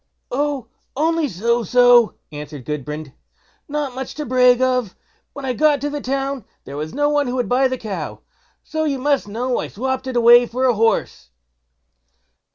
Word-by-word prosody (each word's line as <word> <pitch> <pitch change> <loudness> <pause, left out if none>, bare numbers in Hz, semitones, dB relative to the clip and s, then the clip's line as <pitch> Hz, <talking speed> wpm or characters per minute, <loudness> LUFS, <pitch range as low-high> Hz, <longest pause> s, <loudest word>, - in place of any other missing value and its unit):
"Oh! 280 -1 -1 0.3
only 320 +2 +1
so 235 +4 0
so", 245 +1 +5 0.2
answered 145 -3 -8
Gudbrand; 150 0 -5 0.5
"not 290 -3 -3
much 260 +1 -6
to 300 - -4
brag 250 0 +4
of. 255 -6 0 0.4
When 280 -1 -7
I 255 - -1
got 300 +2 +3
to 290 +1 -2
the 295 0 -4
town 270 0 -2 0.2
there 140 - -8
was 155 +2 -4
no 290 +1 +1
one 290 -2 +1
who 245 - -2
would 250 -2 -1
buy 260 +2 +3
the 255 0 -3
cow, 215 -5 -6 0.4
so 315 -1 -3
you 290 -3 0
must 280 -2 0
know 240 +4 -2
I - - -3
swopped 260 +3 -3
it 260 - -4
away 240 +1 +7
for 255 +3 -1
a 250 - +4
horse." 225 +1 0
255 Hz, 175 wpm, -20 LUFS, 230-280 Hz, 0.5 s, away